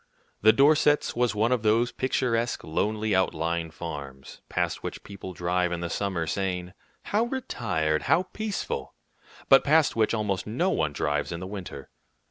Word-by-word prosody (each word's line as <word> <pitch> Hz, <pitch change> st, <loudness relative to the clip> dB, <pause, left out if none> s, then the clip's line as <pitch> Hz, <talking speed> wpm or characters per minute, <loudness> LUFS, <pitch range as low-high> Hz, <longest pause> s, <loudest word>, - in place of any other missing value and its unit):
The 110 Hz, -, +7 dB
Dorsets' 145 Hz, +4 st, +4 dB
was 120 Hz, -3 st, +1 dB
one 110 Hz, +3 st, +2 dB
of 125 Hz, -3 st, +2 dB
those 115 Hz, +3 st, +2 dB
picturesque, 120 Hz, -3 st, 0 dB
lonely, 105 Hz, +6 st, -1 dB
outlying 85 Hz, -2 st, 0 dB
farms, 70 Hz, -5 st, -8 dB
past -, -, -1 dB
which -, -, -6 dB
people 100 Hz, -2 st, -8 dB
drive 90 Hz, 0 st, 0 dB
in 85 Hz, -1 st, -3 dB
the 85 Hz, -1 st, -3 dB
summer, 95 Hz, -5 st, -1 dB
saying, 90 Hz, 0 st, -2 dB, 0.3 s
"How 215 Hz, +3 st, +1 dB
retired! 100 Hz, -, -1 dB
how 180 Hz, -, +4 dB
peaceful!" 210 Hz, +2 st, -4 dB, 0.5 s
but 135 Hz, -, +7 dB
past 150 Hz, -1 st, +3 dB
which 115 Hz, 0 st, +2 dB
almost 105 Hz, -3 st, -2 dB
no 165 Hz, -, 0 dB
one 80 Hz, -2 st, 0 dB
drives 75 Hz, +1 st, -1 dB
in 85 Hz, -, -4 dB
the 90 Hz, -, -6 dB
winter. 95 Hz, -2 st, -8 dB
100 Hz, 155 wpm, -27 LUFS, 85-125 Hz, 0.5 s, The